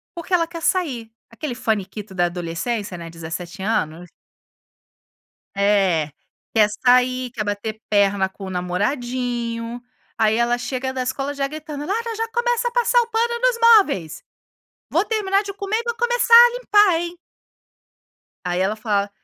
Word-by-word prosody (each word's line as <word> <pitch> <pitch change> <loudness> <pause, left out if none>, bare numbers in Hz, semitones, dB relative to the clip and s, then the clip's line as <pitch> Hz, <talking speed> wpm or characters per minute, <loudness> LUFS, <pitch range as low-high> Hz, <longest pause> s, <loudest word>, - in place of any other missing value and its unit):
Porque 340 +2 -6
ela 335 -2 +3
quer 335 0 -8
sair. 275 -11 -1 0.2
Aquele 245 +3 -5
faniquito 210 -3 -3
da 175 -1 +2
adolescência, 180 +4 -3
né, 170 -1 -8
17 170 +3 -7
anos. 175 -4 -2 1.5
É, 195 -6 +2 0.4
quer 215 -2 +5 0.2
sair, 250 0 +3
quer 225 -3 -4
bater 210 +2 -4
perna 200 -2 +3
com 195 +1 -11
o - - -6
namoradinho. 235 +5 -2 0.4
Aí 220 -1 +3
ela 235 +1 +2
chega 255 +1 -3
da 260 -1 -2
escola 275 +3 -3
já 275 -1 -1
gritando: 300 0 -7
"Lara, 455 +4 -2
já 455 0 -2
começa 480 0 0
a - - -11
passar 485 0 +3
o - - -4
pano 470 +1 0
nos - - +2 0.2
móveis. 190 - -2 0.7
Vou 345 +5 +2
terminar 415 -2 +1
de 400 -1 -6
comer 395 +2 -2
e 470 - -4
vou 470 - -2
começar 480 0 +2
a 480 +1 +10
limpar, 415 -8 +4
hein". 345 0 -5 1.3
Aí 180 0 -1
ela 195 +3 +1
fala: 205 -2 -1
245 Hz, 155 wpm, -21 LUFS, -, 1.5 s, a